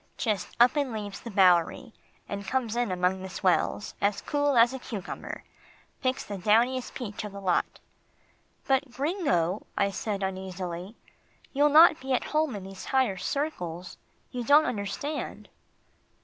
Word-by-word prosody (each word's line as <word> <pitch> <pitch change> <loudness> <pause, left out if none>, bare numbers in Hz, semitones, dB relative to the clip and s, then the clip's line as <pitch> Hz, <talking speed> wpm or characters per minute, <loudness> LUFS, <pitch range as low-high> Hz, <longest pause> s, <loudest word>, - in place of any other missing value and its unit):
"Just 215 -4 -2
up 245 +5 +6
and 280 -3 0
leaves 205 -3 -5
the 235 - -8
Bowery, 190 +4 +3 0.3
and 200 -1 -5
comes 235 -1 -1
in 240 -4 0
among 180 +1 0
the 190 - -6
swells, 185 +2 0
as 200 0 +1
cool 290 -2 +1
as 235 +2 +6
a 265 - -5
cucumber. 210 -6 -6 0.6
Picks 255 -1 0
the 200 -2 -6
downiest 240 +6 +2
peach 215 -6 -5
of 210 - -6
the 200 - -7
lot." 185 -3 0 0.9
"But, 270 +1 +1
Gringo," 260 - 0
I 200 0 +2
said 200 0 -3
uneasily. 185 0 -5 0.6
"You'll 290 +2 +4
not 315 +2 +7
be 265 0 -2
at 250 - +1
home 305 -5 +1
in 200 - -6
these 190 0 -9
higher 260 -8 +1
circles. 180 - -4 0.3
You 245 -1 -3
don't 290 +5 +6
understand." 250 +8 -4
215 Hz, 150 wpm, -28 LUFS, 190-265 Hz, 0.9 s, not